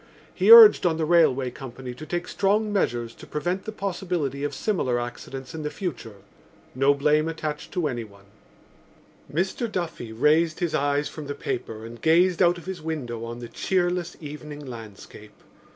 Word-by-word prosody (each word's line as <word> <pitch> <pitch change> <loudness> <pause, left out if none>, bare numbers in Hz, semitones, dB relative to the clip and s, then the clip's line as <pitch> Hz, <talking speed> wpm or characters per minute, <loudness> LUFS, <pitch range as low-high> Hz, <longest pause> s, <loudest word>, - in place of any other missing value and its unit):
He - - +1
urged 460 -2 +10
on 160 -2 0
the 160 - 0
railway 145 -6 +3
company 130 0 -8
to 155 +5 -10
take 175 +2 -3
strong 210 +2 +1
measures 120 - -1
to - - -14
prevent 175 +5 -3
the 220 - -4
possibility 175 -9 -3
of 145 -1 -2
similar 130 - 0
accidents 130 +4 -7
in 160 - -5
the 150 - -3
future. 145 - -6 0.6
No 135 +2 +3
blame 150 +2 +2
attached 155 -2 -5
to 175 -4 0
anyone. 110 -7 -7 1.1
Mr 190 +8 -1
Duffy 165 - -4
raised 155 +8 +2
his 175 -4 -1
eyes 145 0 +1
from 150 -2 -8
the 145 - -4
paper 115 -5 -5
and 115 +1 -10
gazed 175 +2 +3
out 175 -1 +4
of 170 - -11
his 185 -3 -6
window 130 -8 -4
on 120 +1 -7
the 120 - -6
cheerless 175 +3 -1
evening 150 -1 -8
landscape. 110 -3 -11
150 Hz, 170 wpm, -25 LUFS, 125-175 Hz, 1.1 s, urged